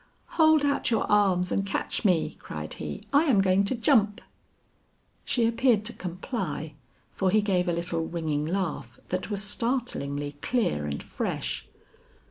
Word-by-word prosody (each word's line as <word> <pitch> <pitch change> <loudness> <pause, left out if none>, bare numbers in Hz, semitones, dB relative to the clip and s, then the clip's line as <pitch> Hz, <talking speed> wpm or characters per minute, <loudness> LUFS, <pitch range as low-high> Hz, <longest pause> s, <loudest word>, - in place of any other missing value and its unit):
"Hold 315 -2 +4
out 280 - +1
your 225 -2 +2
arms 190 -3 +3
and 195 - +1
catch 195 +4 -2
me," 180 -6 +2
cried - - -6
he; - - -6
"I 290 +3 +5
am 255 -10 +4
going 195 0 +4
to 230 - -1
jump." 225 -4 +3 1.1
She 235 -2 +2
appeared 230 -2 +2
to 235 - -1
comply; 180 - -4 0.4
for 190 - 0
he 215 +3 +4
gave 190 -3 +1
a - - +1
little 170 -1 -2
ringing 155 -3 -2
laugh 185 -2 -3
that 185 +2 -2
was 205 -1 -1
startlingly 205 - -2
clear 190 - 0
and 70 0 -4
fresh. - - -3
195 Hz, 150 wpm, -27 LUFS, 170-230 Hz, 1.1 s, I